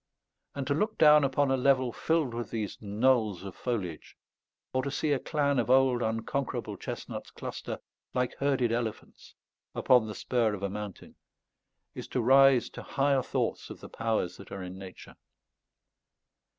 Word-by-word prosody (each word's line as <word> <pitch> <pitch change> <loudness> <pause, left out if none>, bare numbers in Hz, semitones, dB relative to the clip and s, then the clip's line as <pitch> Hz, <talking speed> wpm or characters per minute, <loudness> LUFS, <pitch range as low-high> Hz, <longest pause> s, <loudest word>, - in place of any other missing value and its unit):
And 140 -1 -3
to 140 - +1
look 210 +9 -1
down 150 -1 +7
upon 140 0 +2
a - - +4
level 130 -1 +3
filled 160 -7 0
with 120 0 -4
these 110 -4 -4
knolls 110 -2 +1
of 95 -2 -7
foliage, 100 -10 -4 0.6
or 130 - +2
to 140 - -3
see 150 +2 -1
a 140 - +2
clan 140 -3 0
of 120 - -1
old 130 -1 +4
unconquerable 115 +4 -2
chestnuts - - -6
cluster - - -6 0.4
"like 125 -1 0
herded 135 -4 +1
elephants" 115 -2 -5 0.4
upon 125 -4 +4
the 105 - -6
spur 115 -4 0
of 100 - -9
a 100 - -1
mountain, 105 -2 -8 0.8
is - - -7
to - - -2
rise 135 +1 +6
to - - -8
higher 140 -1 +1
thoughts - - -2
of - - -9
the - - -10
powers 110 -6 -1
that 100 - -13
are 95 - -5
in 90 +1 -8
Nature. 95 -1 -11
125 Hz, 165 wpm, -29 LUFS, 110-135 Hz, 0.8 s, down